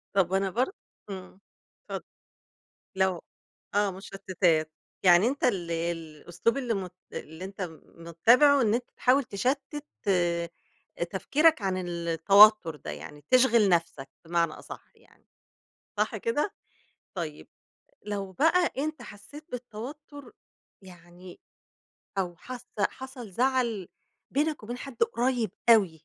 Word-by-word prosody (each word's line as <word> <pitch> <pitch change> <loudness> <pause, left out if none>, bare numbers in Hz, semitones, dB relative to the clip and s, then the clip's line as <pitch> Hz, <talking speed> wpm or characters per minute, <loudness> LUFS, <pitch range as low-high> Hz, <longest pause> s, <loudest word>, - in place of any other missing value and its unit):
طب 190 -1 +2
أنا 195 0 +2
برضه 255 - 0 0.4
إمم، 190 0 -8 0.5
اتفضل. - - -4 0.9
لو 190 -2 +1 0.5
آه، 205 -1 +3
مُشَتِّتات 185 -4 0 0.3
يعني 180 +4 +6
أنتَ 275 +2 -3
ال 175 -8 +1
الأسلوب 165 - -2
اللي 245 -4 -1
م 190 -3 -3 0.2
اللي 160 +4 -7
أنتَ 195 0 -8 0.4
مُتَّبِعه، 240 - +5
إن 215 -2 +3
أنتَ 245 +1 0
تحاول 265 +2 +4
تَشتِّت 275 +7 -2 0.2
آآ، 170 -2 +1 0.6
تفكيرك 305 - +3
عن 190 -1 0
ال 170 -2 -4
التوتر 195 +1 +6
ده - - -7
يعني، 145 0 -9
تشغَل 235 -5 +5
نفسك 165 -6 0 0.2
بمعنى 170 -1 +1
أصح - - -11
يعني، - - -26 0.7
صح - - 0
كده؟ 410 -4 -1 0.6
طيب 155 -3 -5 0.6
لو 200 -2 -4
بقى 330 - +3
أنتَ 305 -1 -2
حسّيت 250 +8 -12
بالتوتر 255 +4 -8 0.5
يعني 175 0 -14 0.8
أو 175 -2 -1
حاسَّة 250 +4 -9 0.2
حصل 260 -5 -9
زعل 240 -4 0 0.4
بينك 295 -1 0
وبين 240 +3 -6
حد 275 - -6
قريب 250 - +1 0.2
أوي 205 -7 +6
200 Hz, 115 wpm, -28 LUFS, 175-255 Hz, 0.9 s, يعني